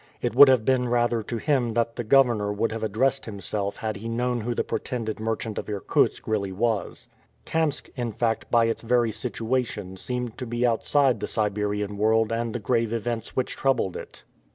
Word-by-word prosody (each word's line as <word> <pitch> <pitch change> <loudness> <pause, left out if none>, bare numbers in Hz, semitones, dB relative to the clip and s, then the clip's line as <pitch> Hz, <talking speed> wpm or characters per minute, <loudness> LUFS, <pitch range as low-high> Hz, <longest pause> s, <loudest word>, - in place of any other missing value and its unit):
It - - -2
would 140 +3 +9
have 130 -4 +4
been 125 -2 +2
rather 120 -1 +2
to 115 +2 -4
him 125 -4 0
that 115 0 0
the 120 - -3
Governor 115 -4 +3
would 105 +3 -1
have 115 0 -4
addressed 125 +6 0
himself 100 -1 -3
had 110 -3 -3
he 115 +3 -6
known 120 +1 -1
who 120 +2 -2
the - - 0
pretended 115 -5 -3
merchant 110 0 -2
of - - -7
Irkutsk 100 -2 0
really 100 -3 -1
was. 110 +2 -2 0.4
Kamsk, 160 -3 -1
in 120 -3 -2
fact, 115 +1 -1
by 115 -1 +4
its 115 - -1
very 120 -1 +2
situation 115 -4 -3
seemed 125 +2 -4
to 125 - -4
be 120 +1 0
outside 125 +1 +2
the - - -3
Siberian 105 -1 -1
world 110 +1 +3
and 115 0 -2
the - - -1
grave 115 +1 0
events 115 0 -3
which 130 - -1
troubled 135 -9 0
it. - - -9
115 Hz, 190 wpm, -25 LUFS, 110-125 Hz, 0.4 s, would